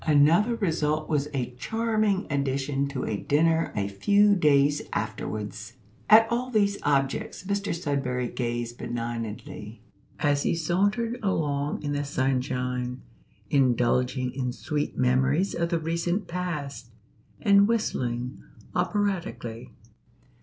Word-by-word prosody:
Another 160 +10 +5
result 155 -7 0
was 145 -2 +1
a 125 -3 -2
charming 215 - 0
addition 140 0 0
to 140 -2 -4
a 105 - -1
dinner 160 +7 +2
a 100 -1 0
few 205 - +4
days 145 -3 +3
afterwards. 105 0 -4 0.4
At 220 +1 +9
all 245 +2 0
these 200 -4 +2
objects 135 +3 0
Mr 200 +1 -1
Sudberry 140 -7 -1
gazed 120 -1 -3
benignantly 115 -2 -5 0.3
as 145 -1 +2
he - - +1
sauntered 205 +9 0
along 145 -9 -1
in 145 - -2
the 145 0 -1
sunshine, 125 -2 -1 0.5
indulging 125 -1 +2
in 130 -2 -2
sweet 150 +2 -3
memories 135 +8 +2
of 170 0 -1
the 170 - +1
recent 170 +4 -1
past, 150 -9 -4 0.5
and 200 -2 +5
whistling 125 - -1 0.3
operatically. 180 - -2
145 Hz, 115 wpm, -26 LUFS, 125-185 Hz, 0.5 s, At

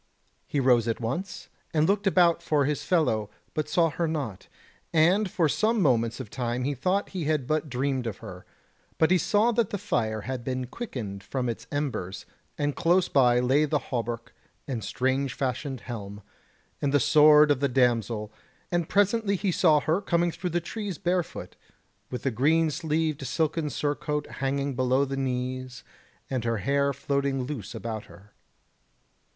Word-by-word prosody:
He 145 - -1
rose 125 -3 +4
at 115 - -1
once, 130 - -4 0.3
and 155 0 +3
looked 200 +1 +1
about 175 -3 +4
for 150 -4 +1
his 150 0 -1
fellow, 110 - +1 0.2
but 150 -1 -2
saw 165 +1 +3
her 170 +1 -1
not, 140 - -4 0.4
and 180 +6 +3
for 170 -2 +2
some 220 +9 +1
moments 115 - +2
of 125 -6 -7
time 125 0 -2
he 145 +2 0
thought 185 +10 0
he 180 -5 -4
had 150 -3 0
but 155 +2 -1
dreamed 130 -1 -1
of 105 - -4
her; 95 -5 -10 0.5
but 160 - +3
he 185 - +5
saw 215 +6 +3
that 230 -3 +1
the 205 - -2
fire 110 - -1
had 130 +1 -5
been 130 0 -2
quickened 120 - -6
from 130 -2 -2
its 115 - -5
embers, 130 -11 -3 0.3
and 145 -1 -1
close 175 +1 +2
by 125 -3 +4
lay 130 +4 +3
the 150 0 +1 0.2
hauberk 115 -1 -3 0.3
and 120 -6 -3
strange 130 0 -1
fashioned 130 0 -3
helm, 105 -4 -7 0.6
and 140 - +1
the 145 - +4
sword 150 +2 +6
of 140 - +2
the 140 0 +1
damsel, 115 -4 +1 0.4
and 175 -2 0
presently 205 +1 +2
he 195 0 0
saw 160 -3 +4
her 160 +7 +1
coming 175 -3 +1
through 180 +2 -4
the 175 +1 0
trees 200 +1 -5
barefoot, 175 -1 -2 0.5
with 125 - -5
the 135 - +1
green 155 +7 +2
sleeved 155 -2 -1
silken 160 -1 0
surcoat 150 0 -2 0.2
hanging 140 0 -1
below 130 +2 +2
the 135 0 -4
knees 130 -1 -3 0.4
and 130 -3 -2
her 115 -1 0
hair 140 +5 +1
floating 140 -1 -1
loose 125 -5 -6
about 110 -1 -5
her. 95 +4 -17
140 Hz, 170 wpm, -27 LUFS, 125-165 Hz, 0.6 s, sword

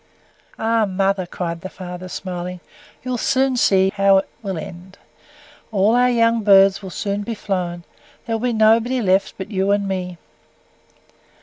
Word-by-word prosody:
"Ah, 225 0 +1
mother," 195 -1 0
cried 170 -1 -5
the 190 - -6
father, 180 -1 -8
smiling, 180 -1 -5 0.4
"you'll 250 -1 -3
see 245 -9 +2
how 195 0 +5
it 190 - -1
will 195 -5 -4
end: 180 +4 -9 0.7
all 205 +1 +3
our 250 +1 +4
young 230 -1 +2
birds 195 -1 +5
will 190 - -7
soon 200 +2 -3
be 225 +2 -4
flown 180 -4 -3 0.4
there 230 - -2
will 240 +2 -1
be - - -3
nobody 225 +3 +3
left 195 -3 +1
but 190 +3 -7
you 195 -1 0
and 200 0 +1
me." 180 -2 -4
195 Hz, 150 wpm, -20 LUFS, 185-225 Hz, 0.7 s, how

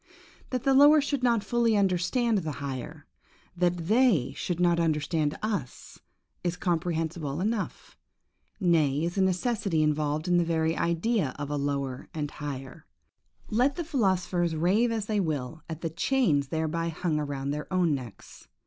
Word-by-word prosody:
That 255 -2 -2
the 270 - +3
lower 290 +3 +7
should 280 -2 -1
not 235 -4 +2
fully 235 -3 +2
understand 200 +4 +1
the 160 -4 -4
higher; 140 +3 -6 0.5
that 175 -1 0
they 215 - +3
should 175 -2 -3
not 175 -1 +3
understand 155 -1 0
us, 200 - -4 0.4
is 175 0 -1
comprehensible 165 -5 -2
enough; 215 +3 -3 0.6
nay, 160 -6 +2
is 175 +3 -2
a - - +4
necessity 190 -3 +1
involved 150 +1 0
in 180 0 +3
the 175 - +4
very 165 -1 0
idea 170 - 0
of 145 0 -5
a - - 0
lower 140 -2 -2
and 150 -2 -3
higher; 135 -3 -7 0.6
let 250 +6 +2
the 345 - -3
philosophers 185 - 0
rave 195 +9 +2
as 220 -3 -2
they 210 -1 0
will 155 -3 -3
at 160 -1 -6
the 165 - -3
chains 165 - +1
thereby 160 +2 -1
hung 165 -1 -1
around 140 -2 -3
their 150 +4 -5
own 180 -4 +2
necks. 120 -8 -8
170 Hz, 155 wpm, -28 LUFS, 150-205 Hz, 0.6 s, lower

